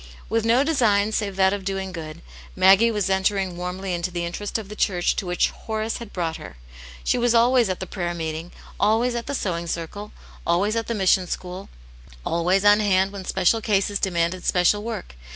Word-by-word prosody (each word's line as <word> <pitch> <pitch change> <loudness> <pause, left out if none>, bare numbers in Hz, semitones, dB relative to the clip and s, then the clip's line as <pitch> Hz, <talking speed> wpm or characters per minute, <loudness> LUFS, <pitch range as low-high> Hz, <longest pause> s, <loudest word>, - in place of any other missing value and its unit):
With 225 0 0
no 240 +4 +4
design 220 -9 +2
save 205 -3 -2
that 190 0 +3
of 200 -1 -4
doing 195 0 -3
good, 160 -1 -8 0.3
Maggie 195 +5 +6
was 210 -4 -1
entering 190 -1 0
warmly 180 +2 -4
into 175 +1 -2
the 175 -1 -3
interest 200 +6 -3
of 220 -3 -7
the 210 - -9
church 180 -4 +1
to 195 - -3
which 175 0 +1
Horace 220 0 -4
had 235 -4 -9
brought 165 -3 -2
her; - - -11 0.5
she - - +1
was 240 0 +2
always 240 -1 +4
at 185 - -2
the - - -4
prayer 175 -2 -4
meeting, 160 +1 -5 0.3
always 225 +4 +2
at 235 -1 -4
the 280 - -2
sewing 170 -7 -2
circle, 175 +6 -5 0.3
always 195 +6 +1
at 230 -1 -2
the 235 - -2
mission 190 -2 +3
school, 185 +2 -6 0.6
always 180 +4 +1
on 205 +1 +7
hand 195 -2 +2
when 195 -2 -8
special 225 +6 +2
cases 205 -1 +1
demanded 180 -1 -1
special 180 +3 +2
work. 210 - -6
195 Hz, 195 wpm, -23 LUFS, 180-215 Hz, 0.6 s, on